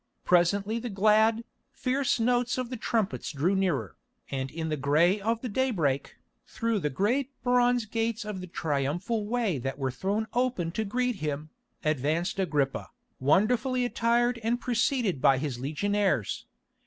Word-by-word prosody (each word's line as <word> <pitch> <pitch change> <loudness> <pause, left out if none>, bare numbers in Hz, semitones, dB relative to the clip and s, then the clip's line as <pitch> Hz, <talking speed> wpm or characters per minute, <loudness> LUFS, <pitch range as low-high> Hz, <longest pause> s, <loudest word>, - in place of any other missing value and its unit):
Presently 195 +5 +2
the 240 +1 -5
glad, 220 +3 +3 0.3
fierce 265 -1 0
notes 245 +1 +1
of 255 -1 -3
the - - -2
trumpets 220 -3 -1
drew 160 +6 +1
nearer, 160 - -1 0.3
and 135 -1 -2
in 160 +2 -4
the 155 - 0
grey 155 +8 +3
of 225 +2 0
the 255 - -3
daybreak, 200 - 0 0.3
through 230 -2 -1
the 150 - -1
great 240 - 0
bronze 245 -1 +3
gates 225 +1 -2
of 210 -3 -5
the 185 - -7
Triumphal 170 - -1
Way 220 - 0
that 135 +2 -4
were 135 -2 -1
thrown 200 - -1
open 240 -9 0
to 220 +5 -2
greet 250 +2 -1
him, 150 -1 -4 0.3
advanced 155 +6 0
Agrippa, 145 -7 0 0.3
wonderfully 240 - +2
attired 240 0 +1
and 230 +2 0
preceded 235 - 0
by 135 - +5
his 130 -3 -3
legionaries. 190 - 0
205 Hz, 150 wpm, -28 LUFS, 155-235 Hz, 0.3 s, by